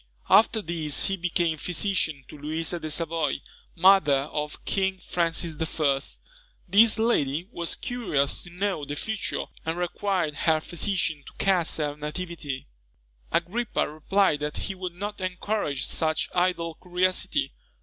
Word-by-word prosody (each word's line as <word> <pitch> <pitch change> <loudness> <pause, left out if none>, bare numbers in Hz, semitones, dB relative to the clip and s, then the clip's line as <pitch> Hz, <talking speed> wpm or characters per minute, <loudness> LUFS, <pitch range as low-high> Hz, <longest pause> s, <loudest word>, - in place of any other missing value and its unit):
After 220 0 +6
this 160 -3 +1
he 195 - 0
became 170 -3 0
physician 165 -6 0
to - - -11
Louisa 160 +4 -2
de 155 - -4
Savoy, 160 -2 0 0.4
mother 175 -6 +6
of 150 0 -4
King 190 -1 0
Francis 170 -2 0
I. 150 -4 +1 0.7
This 215 +5 +6
lady 170 - +1
was 170 -6 -1
curious 175 - 0
to - - -12
know 185 -2 -2
the 145 +1 -4
future, 220 +7 -2 0.2
and 160 +1 -2
required 175 -3 -1
her 160 +1 +3
physician 170 -3 -1
to - - -11
cast 185 -4 +1
her 150 -2 -1
nativity. 150 -2 -5 0.7
Agrippa 220 +7 0
replied 155 +2 +2
that 150 0 -3
he 195 - -3
would 185 -2 -6
not 205 +2 -5
encourage 185 -5 -1
such 155 -1 0
idle 175 -2 +1
curiosity. 180 +1 +1
170 Hz, 135 wpm, -26 LUFS, 150-190 Hz, 0.7 s, After